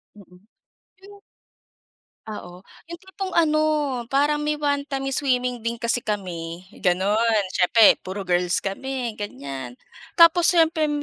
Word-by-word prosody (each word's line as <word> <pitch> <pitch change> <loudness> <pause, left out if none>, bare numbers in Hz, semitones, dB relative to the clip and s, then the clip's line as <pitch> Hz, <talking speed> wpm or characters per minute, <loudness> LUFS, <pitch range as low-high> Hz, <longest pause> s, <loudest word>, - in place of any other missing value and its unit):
Mm. 180 -3 -17 0.7
Yung 405 0 -15 1.1
Oo, 185 -4 -9 0.2
yung 340 - -7
tipong 380 +1 -6
ano, 310 -2 +3 0.5
parang 295 +2 +1
may 300 0 -1
one 285 -1 0
time 270 -1 -3
swimming 250 -3 -1
din 230 +1 -3
kasi 235 +1 -1
kami 180 -5 -5 0.2
ganun, 205 +4 +2
siyempre 210 +5 +5
puro 190 +1 -6
girls 175 0 +1
kami 245 +4 -4
ganiyan. 135 -10 -7 0.4
Tapos 335 0 +6
siyempre 320 -3 +2
235 Hz, 120 wpm, -23 LUFS, 185-300 Hz, 1.1 s, Tapos